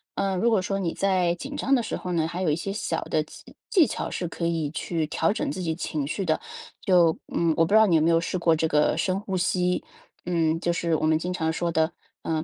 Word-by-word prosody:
嗯， 195 -1 0
如 235 +4 +3
果 220 - +3
说 195 +1 -2
你 175 -4 -1
在 185 -3 +2
紧 275 +10 -7
张 275 -1 0
的 250 - +2
时 - - -3
候 180 - -5
呢， 160 -2 +1
还 175 +2 -5
有 180 - +1
一 150 - +2
些 195 +3 -4
小 215 - -2
的 - - 0
技 - - -15
技 365 -8 +5
巧 - - -4
是 175 - -3
可 170 +1 -4
以 165 -3 -1
去 165 0 -2
调 160 +3 +1
整 285 +7 -2
自 185 - -5
己 160 -2 -1
情 155 -4 -3
绪 190 +6 -3
的。 155 -2 0 0.4
就 175 -4 +4 0.2
嗯， 165 -1 +2
我 165 - +4
不 165 - -2
知 - - +7
道 220 - +7
你 180 -5 +3
有 160 - +4
没 160 - +3
有 165 0 +4
试 170 +2 -2
过 170 -1 +3
这 160 +1 0
个 150 -1 +2
深 185 0 0
呼 190 -2 -3
吸， 180 0 0 0.4
嗯， 165 -2 +1
就 170 0 0
是 170 -1 0
我 155 - 0
们 155 0 +3
经 180 +2 -3
常 160 -3 -1
说 170 +1 -1
的， 160 0 +1 0.3
呃， 160 -1 -1
170 Hz, 285 characters per minute, -25 LUFS, 160-190 Hz, 0.4 s, 知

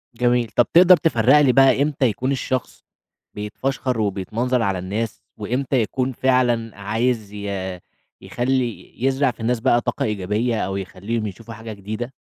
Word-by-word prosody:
جميل، 120 0 +2
طَب 120 - +5
تقدر 180 +1 +8
تفرّق 135 -3 +4
لي 135 -3 +5
بقى، 135 0 +5
إمتى 145 -2 +1
يكون 125 +3 0
الشخص 130 -2 -3 0.5
بيتفشّخر 125 +4 -3
وبيتمنظر 110 +5 -1
على 100 -4 0
الناس، 105 +5 -4 0.2
وإمتى 125 +4 0
يكون 130 +4 -1
فعلًا 120 -4 +1
عايز 110 +1 -1
ي 100 -3 -4 0.4
يخلّي، 125 -1 -2
يزرع 135 0 +2
في - - -23
الناس 115 +1 0
بقى 120 0 +3
طاقة 125 -2 -2
إيجابية، 105 +3 -1
أو 95 +1 -3
يخليهم 100 +4 -4
يشوفوا 115 +4 -9
حاجة 110 0 -8
جديدة؟ 110 +5 -6
115 Hz, 145 wpm, -21 LUFS, 105-130 Hz, 0.5 s, تقدر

